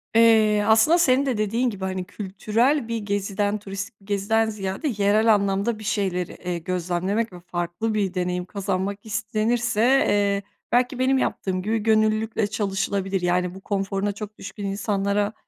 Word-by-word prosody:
Eee, 220 -2 +5
aslında, 220 +10 +5
senin 275 -5 +3
de 255 -5 0
dediğin 225 +4 +1
gibi, 195 -4 -5
hani, 185 -1 -3
kültürel 220 +8 0
bir 230 - -2
geziden, 205 0 -1
turistik 195 +1 -7
bir - - -20
geziden 210 +2 +1
ziyade, 200 +7 -3
yerel 210 +2 +4
anlamda 200 +2 0
bir - - -9
şeyleri, 195 -4 -1
eee, 180 -1 -4
gözlemlemek 185 +5 -2
ve 180 - -9
farklı 175 +5 -3
bir 200 -4 0
deneyim 180 -1 -2
kazanmak 200 +1 -3
istenirse, 220 +2 0
eee, 205 -6 +3 0.3
belki, 250 +1 +2
benim 265 +1 +3
yaptığım 185 -7 -1
gibi, 220 +4 0
gönüllülükle 215 0 +2
çalışılabilir. 195 -2 -1
Yani, 180 0 0
bu, 190 - -10
konforuna 195 0 -1
çok 210 +1 -8
düşkün 200 +1 -7
insanlara 200 +1 0
205 Hz, 150 wpm, -24 LUFS, 195-220 Hz, 0.3 s, Eee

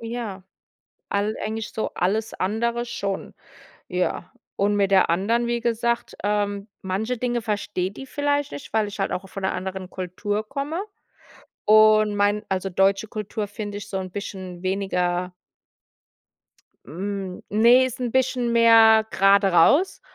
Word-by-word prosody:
ja, 230 -5 -5 0.7
all 205 +2 0
eigentlich 220 0 -4
so 220 - -2
alles 215 +5 0
andere 235 +5 -1
schon. 200 -4 -4 0.6
Ja, - - -2 0.2
und 205 +1 +1
mit 200 -1 +1
der 190 -3 +5
anderen, 225 +7 +1
wie 235 0 0
gesagt, 235 0 -1
ähm, 205 0 -1
manche 215 +6 -2
Dinge 240 0 -1
versteht 205 -3 -3
die 270 - -7
vielleicht 290 0 -1
nicht, 145 - -9
weil 220 -1 +1
ich 200 0 -9
halt 195 - -1
auch 190 +1 -4
von 195 +1 -8
'ner 190 - 0
anderen 185 0 -5
Kultur 205 +4 -4
komme. 290 - -3 0.8
Und 215 0 +5
mein 205 +1 +1
also 190 0 -1
deutsche 195 +3 +2
Kultur 210 0 -4
finde 205 0 -6
ich 205 0 -10
so 195 - -3
'n 185 -1 -5
bisschen 185 -3 -7
weniger 180 -2 -1 1.5
Hm, 190 +2 -5
ne, 235 +5 +5
ist 255 0 -7
'n 245 - -1
bisschen 250 -1 +1
mehr 225 -1 +6
grade 195 0 +4
raus. 285 - +4
205 Hz, 145 wpm, -23 LUFS, 195-230 Hz, 1.5 s, mehr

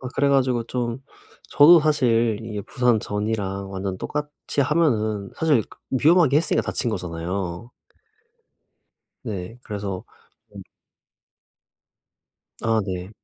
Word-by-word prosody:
아 125 - -6
그래 140 0 +2
가지고 130 -4 +2
좀 120 0 -3 0.5
저도 160 +3 +8
사실 120 -8 +2
이게 105 -2 -5
부상 125 -3 +1
전이랑 100 -2 -3
완전 95 -1 -4
똑같이 150 -1 -4
하면은 110 -10 0
사실 150 -8 +3 0.3
위험하게 150 +1 +4
했으니까 165 - 0
다친 120 - -2
거잖아요. 90 +3 -4 1.5
네 105 0 -6
그래서 100 -3 -5 0.5
좀 - - -11 2.0
아 115 -1 +2
네. 90 +1 -5
115 Hz, 220 characters per minute, -23 LUFS, 100-135 Hz, 2.0 s, 저도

